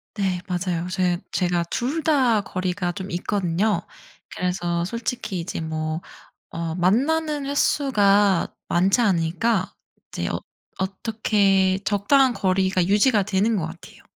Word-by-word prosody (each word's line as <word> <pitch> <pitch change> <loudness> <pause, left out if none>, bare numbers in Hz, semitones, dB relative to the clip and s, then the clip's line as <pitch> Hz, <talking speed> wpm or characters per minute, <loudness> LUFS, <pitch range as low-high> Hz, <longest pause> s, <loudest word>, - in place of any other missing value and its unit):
네 190 -4 -1
맞아요. 180 -1 -2
제 180 -2 +1
제가 175 -1 +1
2 280 +7 -1
다 255 -9 +3
거리가 185 -1 -2
좀 190 +1 -7
있거든요. 190 +2 0 0.6
그래서 175 -1 -1
솔직히 225 -2 -3
이제 170 +1 -5
뭐 155 0 -3 0.5
어 165 -1 -3
만나는 280 - +1
횟수가 205 - +2
많지 190 +7 +3
않으니까 185 +1 +1 0.4
이제 - - -3
어 - - -2 0.4
어떻게 195 -1 +1
적당한 245 +6 +3
거리가 190 -2 +1
유지가 210 +1 +4
되는 210 +3 +1
것 170 -5 -1
같아요. 165 +1 -13
190 Hz, 250 characters per minute, -23 LUFS, 180-220 Hz, 0.6 s, 유지가